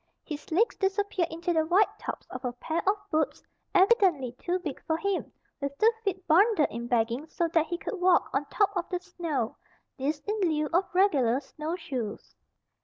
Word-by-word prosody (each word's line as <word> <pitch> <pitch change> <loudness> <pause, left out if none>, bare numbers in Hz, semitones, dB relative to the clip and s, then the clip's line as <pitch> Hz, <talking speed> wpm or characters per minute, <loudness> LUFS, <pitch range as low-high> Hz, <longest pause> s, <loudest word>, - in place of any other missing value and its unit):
His 300 -1 -7
legs 415 +9 +3
disappeared 390 -2 0
into 335 +2 -2
the 320 -1 +3
wide 360 +6 +2
tops - - -5
of 255 +1 -6
a 250 -1 -2
pair 315 +6 -2
of 405 - +3 0.2
boots 310 -1 0 0.3
evidently 370 - +4
too 350 +9 -2
big 320 -7 -6
for 320 - +1
him, 400 +2 -2 0.3
with 280 0 -3
the 450 +2 +5
feet 380 -3 -2
bundled 380 0 +4
in 235 +1 -5
bagging 240 +4 0
so 335 +2 -1
that 325 -1 +2
he 345 - -2
could 370 +1 -5
walk 360 -1 +4
on 275 +2 0
top 405 +5 +1
of 355 -2 -2
the 360 - -1
snow, 335 -10 -3 0.4
this 290 +3 -1
in 420 +6 -2
lieu 310 -4 +2
of 365 +3 +3
regular 275 - +4
snowshoes. 300 - -5
330 Hz, 180 wpm, -28 LUFS, 280-375 Hz, 0.4 s, the